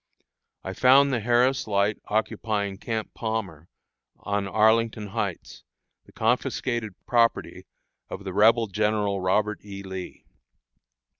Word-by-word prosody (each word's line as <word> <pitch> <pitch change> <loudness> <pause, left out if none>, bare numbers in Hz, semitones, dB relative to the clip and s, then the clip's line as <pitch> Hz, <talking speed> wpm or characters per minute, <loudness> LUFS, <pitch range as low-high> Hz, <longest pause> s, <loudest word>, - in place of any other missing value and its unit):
I 95 - -5
found 135 +5 +5
the 120 - +1
Harris 120 +4 +2
Light 100 0 +1
occupying 105 -2 -2
Camp 110 -1 -4
Palmer, 100 -8 -4 0.5
on 100 -1 -2
Arlington 110 +1 +2
Heights, 100 -4 -5 0.4
the - - -17
confiscated 120 -2 -1
property 115 -1 0 0.4
of 100 - -7
the 95 -2 -5
Rebel 115 +3 +4
General 105 -1 0
Robert 105 +3 0
E. 100 -1 -8
Lee. 95 -1 -8
105 Hz, 115 wpm, -25 LUFS, 100-115 Hz, 0.5 s, found